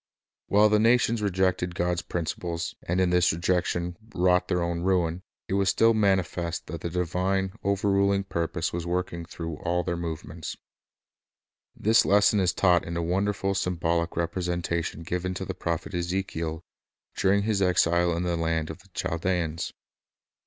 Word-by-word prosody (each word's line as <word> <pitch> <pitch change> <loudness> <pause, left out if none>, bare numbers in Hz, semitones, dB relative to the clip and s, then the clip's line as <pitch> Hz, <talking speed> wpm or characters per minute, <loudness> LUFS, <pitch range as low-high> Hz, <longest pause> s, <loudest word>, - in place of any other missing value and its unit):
While 105 +1 +5
the 105 0 +4
nations 115 0 +3
rejected 95 -3 0
God's 90 0 0
principles, 85 0 -3
and 90 +2 +1
in 90 -1 +2
this 90 0 +4
rejection 85 +1 -1 0.2
wrought 90 0 +3
their 90 -1 0
own 85 0 -2
ruin, 90 -2 +1 0.3
it - - -3
was 100 -1 +2
still 115 0 +4
mani 100 -4 +3
fest 85 0 -4
that 85 -2 -7
the 85 - -3
divine, 90 +2 -1
overruling 100 0 +2
purpose 85 -2 -2
was 85 0 -2
working 85 -1 -2
through 80 -3 -6
ali 90 0 0
their 85 -1 -2
movements. 80 -1 -5 1.2
This 110 +2 +4
lesson 105 +1 +4
is 90 -2 +3
taught 90 -3 +3
in 85 0 -4
a 85 - -1
wonderful 100 +3 0
symbolic 85 -2 0
repre 85 +2 -1
sentation 85 -2 -2
given 90 +2 -2
to 95 - -4
the 95 - -4
prophet 85 +1 -3
Ezekiel 85 -2 -2 0.5
during 100 +1 +2
his 105 -2 0
exile 85 -2 +3
in 85 - -1
the 90 -1 0
land 80 -1 -1
of - - -10
the - - -21
Chaldeans. 85 -1 -1
90 Hz, 160 wpm, -27 LUFS, 85-95 Hz, 1.2 s, While